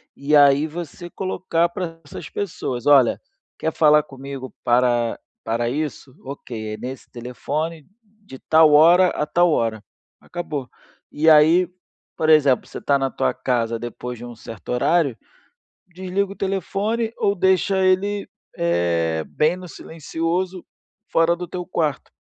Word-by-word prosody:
E 145 +2 +1
aí 145 +1 +5
você 175 +2 -8
colocar 180 -2 -1
para 170 -2 -6
essas 145 - -9
pessoas: 130 - -4
"Olha, 140 -5 +5 0.4
quer 160 - -2
falar 150 -1 +5
comigo 135 -3 -9
para 120 -1 +2 0.2
para 115 +1 -1
isso? 140 0 -4
Ok, 115 -5 -7
é - - -6
nesse 130 +3 -8
telefone 145 +6 -5 0.2
de 210 -9 -15
tal 160 +2 +4
hora 170 +5 +7
a 150 - -2
tal 175 +2 +2
hora." 115 -6 -1 0.4
Acabou. 155 -7 -6 0.4
E 160 +2 +3
aí, 160 +4 +6 0.5
por 155 - 0
exemplo, 145 -5 +4
você - - -9
está 140 - +2
na 135 0 0
tua - - 0
casa 115 -2 -1
depois 120 +1 -6
de 120 - -9
um 120 -1 -9
certo 115 -1 -11
horário, 140 +1 +1 0.7
desliga 185 +2 -3
o - - -8
telefone 200 +4 -2
ou 200 - +1
deixa 190 +1 +2
ele, 200 +2 +1 0.3
eh, 85 -2 0
bem 155 +3 +1
no 185 0 -9
silencioso 165 +3 -4 0.5
fora 165 +1 +3
do 175 0 -7
teu 180 +1 -6
quarto. 155 -6 -2
155 Hz, 145 wpm, -21 LUFS, 125-175 Hz, 0.7 s, hora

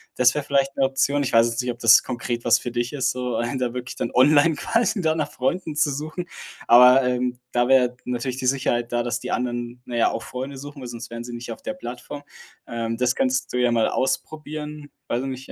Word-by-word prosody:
Das 125 0 +4
wäre 150 - -2
vielleicht 140 -1 0
'ne 135 - +2
Option. 135 +2 +1
Ich 135 - -1
weiß 115 0 +6
jetzt 115 +1 -2
nicht, 125 0 -2
ob 120 - -9
das 115 -1 +7
konkret 120 -1 -4
was 120 -1 +5
für 120 - -6
dich 120 +2 -2
ist, 135 -2 0
so, 125 -2 -3
einen 120 +4 -2
da 125 -1 -1
wirklich 125 0 -5
dann - - -2
online 145 +4 +5
quasi 230 +5 0
da 160 -2 +2
nach 150 -2 -2
Freunden 155 +4 -2
zu 150 0 +2
suchen. 155 +5 -5 0.4
Aber, 125 +2 +8
ähm, 125 0 -1
da 120 0 +2
wäre 125 -2 +4
natürlich 125 +1 -3
die 130 - -2
Sicherheit 120 -3 0
da, 120 0 0
dass 120 0 -2
die - - -7
anderen, 120 0 -3
na 120 - -6
ja, 115 - +3
auch 115 - -4
Freunde 130 +2 -6
suchen, 145 +1 -9
weil 125 - -6
sonst 120 -1 -8
wären 115 0 -6
sie 120 0 -8
nicht 120 0 -6
auf 115 - -8
der - - -4
Plattform, 125 -1 -8 0.4
ähm, 115 0 -3
das 125 0 +2
könntest 130 0 0
du - - 0
ja 125 -1 +2
mal 115 -1 +2
ausprobieren. 150 +2 -3 0.2
Weiß 120 - -1
ich 135 - -4
nicht, 130 0 -7
125 Hz, 240 wpm, -23 LUFS, 120-140 Hz, 0.4 s, Aber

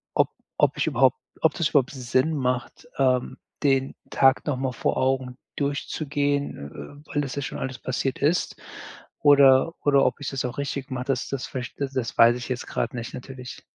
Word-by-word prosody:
ob - - +3 0.3
ob - - +2
ich - - 0
überhaupt - - +3 0.2
ob - - +4
das 165 -3 +1
überhaupt 140 -2 +2
Sinn 130 +3 0
macht, 125 +3 -2
ähm, 130 -2 +1 0.3
den 135 -1 +2 0.2
Tag 135 0 +4
nochmal 130 -2 -1
vor - - -1
Augen 130 -1 0 0.2
durchzugehen, 145 - -2
äh, - - -24
weil 145 - +2
das 135 -2 -4
ja 140 - -2
schon - - -5
alles 130 -1 -4
passiert 130 +1 -2
ist 155 +5 +1 0.6
oder 140 +1 +6
oder 140 -2 +4
ob 125 +2 0
ich 145 - -3
das 135 -2 -3
auch 125 - -4
richtig 140 -1 -3
mache, 125 0 -3
das 135 -2 -1
das 140 -2 -3
vielleicht 130 0 -6
da - - +3
das 125 -3 -3
weiß 115 +1 +7
ich 125 - -7
jetzt 125 -1 -3
gerade - - -2
nicht 115 0 -6
natürlich. 125 0 -9
135 Hz, 185 wpm, -25 LUFS, 125-140 Hz, 0.6 s, weiß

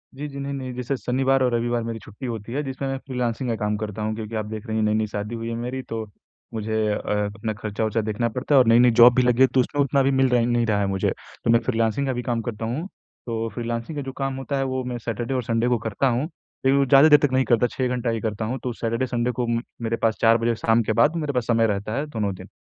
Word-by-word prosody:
जी, 145 +2 -5
जी। 140 -1 -8
नहीं, 140 0 -4
नहीं 130 -2 -5
जैसे 125 +2 -2
शनिवार 130 +2 +1
और 125 -1 +1
रविवार 120 0 0
मेरी 115 0 -4
छुट्टी 105 +5 -10
होती 115 -1 -5
है 145 - 0
जिसमें 135 0 -4
मैं 135 - -2
फ्रीलांसिंग 125 -2 -3
का 115 - 0
काम 105 0 -1
करता 105 0 -5
हूँ 110 0 -1
क्योंकि 110 0 -6
आप 110 -1 -2
देख 110 +2 -7
रही 110 - -2
हैं 110 - +1
नई-नई 110 0 +1
शादी 105 +2 -4
हुई 115 0 -4
है 115 - -3
मेरी 125 +3 -4
तो 115 -1 -3 0.5
मुझे 110 0 -3 0.2
अ, 105 - 0 0.4
अपना 110 0 -3
खर्चा-वर्चा 110 +1 -2
देखना 110 +2 -1
पड़ता 125 +5 0
है - - +8
और 125 - +4
नई-नई 120 +2 +6
जॉब 120 +1 +9
भी 130 - +4
लगी 125 0 +2
है 130 - +8
तो 130 - +3
उसमें 145 +3 +1
उतना 140 0 +2
भी 135 - +2
मिल 135 -1 +3
र 125 -1 +3
नहीं 120 0 +1
रहा 105 -2 +1
है 100 - +1
मुझे, 95 -1 0 0.3
तो - - 0
मैं 115 - +5
फ्रीलांसिंग 115 +3 0
का 130 - 0
भी 125 - -3
काम 120 -1 -1
करता 110 -1 -5
हूँ, 135 +11 -3 0.4
तो 115 -1 -2
फ्रीलांसिंग 115 +6 -4
का - - -1
जो 135 - -5
काम 135 -1 -2
होता 135 +1 -3
है 135 - +1
वो 130 -1 -2
मैं 125 -1 -4
सैटरडे 120 +2 -3
और 130 -1 -1
संडे 115 0 0
को 120 - +3
करता 115 +4 -1
हूँ। 125 +1 +1 0.4
लेकिन 135 +1 +4
वो 140 - +3
ज़्यादा 135 +3 +7
देर 150 -1 +8
तक 140 - -1
नहीं 130 0 +3
करता 120 +1 +3
6 130 +1 -2
घंटा 125 -1 -1
ही 115 -1 -1
करता 110 -1 -2
हूँ 125 +4 -3
तो 125 - -2
सैटरडे 115 +2 -1
संडे 120 0 0
को 125 0 -2
उम, 115 0 0 0.2
मेरे 115 0 -1
पास 115 -1 +1
4 115 0 +6
बजे 115 0 0
शाम 115 +1 +2
के 110 - 0
बाद 150 +3 +4
मेरे 150 -3 -2
पास 125 -3 -1
समय 115 -1 +3
रहता 105 0 -2
है 145 - -1
दोनों 105 -8 -2
दिन। - - -11
120 Hz, 285 wpm, -23 LUFS, 110-130 Hz, 0.5 s, जॉब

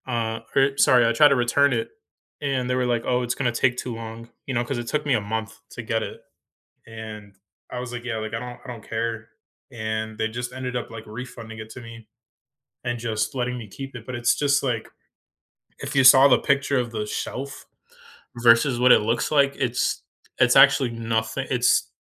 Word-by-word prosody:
Uh, 115 -2 -2 0.2
I 135 0 +4
sorry, 125 -3 +5
I 115 - +2
tried 145 +5 +6
to 140 - +3
return 135 +3 +3
it 115 -1 -2 0.5
and 135 -3 -1
they 125 - +1
were 125 0 +1
like, 120 -1 0
"Oh, 125 0 +1
it's 120 0 -2
gonna 125 -3 0
take 125 +1 +1
too 125 - -4
long," 115 +1 -8 0.2
you 135 - -3
know, 120 0 +1
'cause 130 +1 -3
it 120 - -6
took 150 +4 -1
me 145 - +2
a 110 - +2
month 110 +1 -5
to 120 - -7
get 110 0 -1
it, - - -7 0.7
and 110 -3 -9 0.3
I 125 - -5
was 125 -1 -6
like, 120 0 -7
"Yeah, 115 -2 -2
like, 110 +1 -5
I 115 - -2
don't 125 0 -8
I - - -13
don't 120 -4 -9
care," 115 0 -3 0.4
and 110 -1 -4
they 110 - -1
just 120 +2 -5
ended 130 -1 -5
up, 120 - -5
like, 115 -1 -9
refunding 115 0 -8
it 110 0 -8
to 130 - -9
me 115 -1 -12 0.8
and 120 -1 -2
just 115 0 -2
letting 125 0 -1
me 110 -3 -9
keep 135 +6 -9
it, 120 -3 -9
but 125 - -5
it's 120 0 +2
just 140 -1 +2
like, 120 -4 -2 0.9
if - - -6
you 135 - +5
saw 130 +2 +9
the 135 - +4
picture 140 -1 +1
of 120 -2 -1
the 110 -2 -3
shelf 135 +5 -5 0.8
versus 120 +2 +5
what 125 0 +6
it - - +6
looks 115 +3 -1
like, 140 -2 +3
it's 125 -2 -1 0.4
it's 125 -1 +4
actually 135 -3 +6
nothi 115 +2 -2
it's 125 -1 +2
120 Hz, 210 wpm, -24 LUFS, 115-130 Hz, 0.9 s, saw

